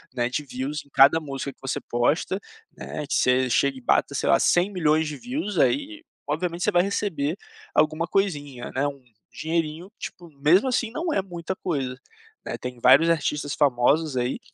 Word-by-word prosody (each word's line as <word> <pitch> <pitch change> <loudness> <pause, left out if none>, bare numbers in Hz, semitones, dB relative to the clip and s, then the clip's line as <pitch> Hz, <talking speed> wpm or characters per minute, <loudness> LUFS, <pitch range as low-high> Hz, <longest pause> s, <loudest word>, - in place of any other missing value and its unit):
né, 120 -1 0
de 140 +4 -2
views 135 +4 -4
em - - -24
cada 140 +4 +6
música 140 -2 -5
que - - -41
você 135 -1 -2
posta, 145 +10 0 0.4
né, 150 - -6
que - - -3
você 125 0 +3
chega 140 +2 +2
e 130 - -10
bata - - +1
sei - - 0
lá - - +5
100.000.000 165 -4 +2
de 150 -2 -5
views 245 - -3
aí 310 +3 +1 0.2
obviamente 170 +3 -2
você 210 - +2
vai 175 -1 +4
receber 180 -6 -1 0.4
alguma 155 +2 +2
coisinha, 145 -11 -2
né, 140 +2 +1
um 140 -2 -7 0.3
dinheirinho 165 +3 -3
tipo 175 -2 -8
mesmo 180 - +5
assim 240 -2 0
não 320 +5 -2
é 195 - +2
muita 175 -1 -5
coisa, 135 -9 -3 0.5
né, - - -4
tem 125 -1 -7
vários 140 +6 +6
artistas 150 -2 0
famosos 140 +2 +2
aí 125 +1 -1
155 Hz, 180 wpm, -25 LUFS, 135-180 Hz, 0.5 s, cada